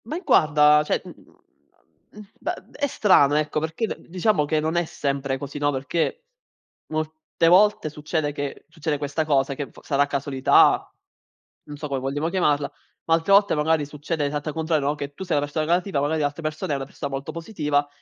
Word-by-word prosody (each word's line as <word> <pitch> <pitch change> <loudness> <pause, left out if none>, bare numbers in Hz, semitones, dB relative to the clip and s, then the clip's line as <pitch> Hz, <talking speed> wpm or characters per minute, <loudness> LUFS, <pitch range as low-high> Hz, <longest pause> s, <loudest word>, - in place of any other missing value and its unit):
Ma 270 - -5
i 350 - -4
guarda, 150 0 +5
cioè - - 0
mhmm, - - -10 1.0
m 210 - -12 0.2
bah, - - -2 0.2
è 285 - -1
strano, 165 - +4
ecco, 155 0 0
perché 160 +8 -2
d - - -7
diciamo 180 -2 +1
che 155 +1 +1
non 160 +2 -1
è 175 - +2
sempre 140 -3 -2
così, 140 +2 -7
no, 145 0 +2
perché, 160 - -2 0.6
molte 155 +1 -2
volte 190 -1 +4
succede 150 0 -2
che 145 -1 -6
succede 155 -2 -2
questa 145 +2 -2
cosa 140 -2 +1
che 145 0 -4
v - - -17
sarà 145 -1 +1
casualità, 140 -1 +3 0.7
non 145 -1 -9
so 150 - -5
come 135 -2 -2
vogliamo 145 +4 -2
chiamarla, 150 -6 +1 0.3
ma 165 - +2
altre 165 +4 -1
volte 200 +1 +5
magari 155 0 +1
succede 150 +2 -4
l'esatta 145 +1 -3
contrario, 160 -3 0
no, 145 - +1
che 145 -1 -6
tu 190 - -7
sei 175 -5 0
una 145 - +1
persona 155 +2 -2
negativa, 175 0 +1
magari 155 +2 0
l'altra 145 +2 -2
persona 155 -1 -3
è - - +1
una 135 - -5
persona 140 +1 -6
molto 135 0 -4
positiva, 150 -5 -1
150 Hz, 195 wpm, -24 LUFS, 145-165 Hz, 1.0 s, guarda